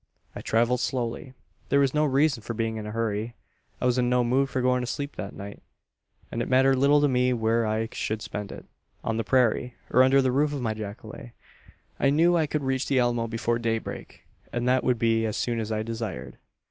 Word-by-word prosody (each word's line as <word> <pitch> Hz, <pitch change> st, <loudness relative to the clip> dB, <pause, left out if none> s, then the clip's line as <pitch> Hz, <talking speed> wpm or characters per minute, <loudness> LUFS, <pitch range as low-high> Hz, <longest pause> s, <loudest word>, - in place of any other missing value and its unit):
"I -, -, -6 dB
travelled 120 Hz, +2 st, +1 dB
slowly. 125 Hz, +1 st, -3 dB, 0.3 s
There 140 Hz, -, +4 dB
was 140 Hz, -2 st, +2 dB
no 150 Hz, 0 st, +2 dB
reason 140 Hz, -2 st, +2 dB
for 115 Hz, +2 st, -5 dB
being 110 Hz, 0 st, -2 dB
in 105 Hz, -1 st, -5 dB
a -, -, -5 dB
hurry. 115 Hz, 0 st, -2 dB, 0.4 s
I -, -, -2 dB
was 125 Hz, 0 st, +2 dB
in 120 Hz, -1 st, +2 dB
no 125 Hz, 0 st, +3 dB
mood 130 Hz, +3 st, +1 dB
for 130 Hz, -, -2 dB
going 125 Hz, 0 st, +2 dB
to 125 Hz, -, -4 dB
sleep 140 Hz, +3 st, -4 dB
that 100 Hz, -, -6 dB
night; 100 Hz, 0 st, -9 dB, 0.7 s
and 120 Hz, -, -2 dB
it -, -, -3 dB
mattered 135 Hz, +1 st, +4 dB
little 145 Hz, +2 st, +4 dB
to 145 Hz, -, +4 dB
me 125 Hz, -1 st, +2 dB
where 115 Hz, -1 st, +1 dB
I 110 Hz, +1 st, -1 dB
should 110 Hz, 0 st, -3 dB
spend 105 Hz, -1 st, -5 dB
it -, -, -10 dB, 0.4 s
on 115 Hz, -, -1 dB
the 115 Hz, -, 0 dB
prairie, 125 Hz, -1 st, +1 dB, 0.2 s
or 125 Hz, -, +5 dB
under 130 Hz, +1 st, +5 dB
the 130 Hz, -1 st, +2 dB
roof 145 Hz, +3 st, +1 dB
of 140 Hz, -, -3 dB
my 110 Hz, -2 st, 0 dB
jacale. 110 Hz, +3 st, -8 dB, 0.7 s
I 140 Hz, -, +3 dB
knew 165 Hz, +5 st, +4 dB
I 160 Hz, -3 st, +2 dB
could 150 Hz, -1 st, -2 dB
reach 130 Hz, 0 st, -1 dB
the 135 Hz, -, +1 dB
Alamo 120 Hz, -2 st, +1 dB
before 115 Hz, +1 st, -1 dB
daybreak; 115 Hz, -1 st, -4 dB, 0.3 s
and 120 Hz, 0 st, -2 dB
that 130 Hz, 0 st, +3 dB
would 125 Hz, -2 st, +2 dB
be 115 Hz, 0 st, +2 dB
as 110 Hz, -, -3 dB
soon 120 Hz, -1 st, -1 dB
as 110 Hz, 0 st, -4 dB
I 110 Hz, 0 st, -1 dB
desired. 110 Hz, -, -6 dB
120 Hz, 225 wpm, -26 LUFS, 115-130 Hz, 0.7 s, or